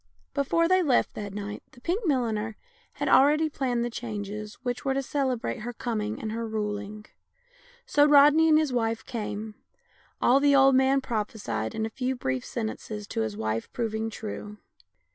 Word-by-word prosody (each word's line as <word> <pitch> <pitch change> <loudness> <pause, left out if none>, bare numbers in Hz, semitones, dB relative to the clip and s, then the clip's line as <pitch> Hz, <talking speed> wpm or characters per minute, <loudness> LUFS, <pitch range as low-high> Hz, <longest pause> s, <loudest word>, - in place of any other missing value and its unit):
Before 335 +4 +2
they 370 +1 +4
left 275 -8 +2
that 205 -1 -6
night 205 +1 -6
the - - -16
pink 365 - -1
milliner 225 -6 0 0.4
had - - -3
already 300 +3 +5
planned 245 -4 -1
the - - -2
changes 210 -2 -5
which 245 -1 -3
were 270 -1 0
to 275 - 0
celebrate 260 -3 -1
her 240 +3 -5
com 230 -2 -2
ing 210 +1 -3
and 220 - -4
her 230 +1 -3
ruling. 210 -1 -4 0.8
So 290 -12 +4
Rodney 295 +2 +6
and 310 - +6
his 305 -4 +1
wife 225 -2 -1
came, 215 -2 -5 0.7
all 255 +3 +5
the 285 0 +4
old 270 0 +6
man 265 +1 +4
prophe 225 -4 -3
sied 110 - -3
in 220 - -1
a - - -3
few 260 +1 -2
brief 130 - -2
sentences 220 -2 -5
to - - -2
his 110 -2 -3
wife 110 +1 -2
proving 225 -1 -2
true. 210 -1 -7
230 Hz, 180 wpm, -27 LUFS, 210-270 Hz, 0.8 s, Rodney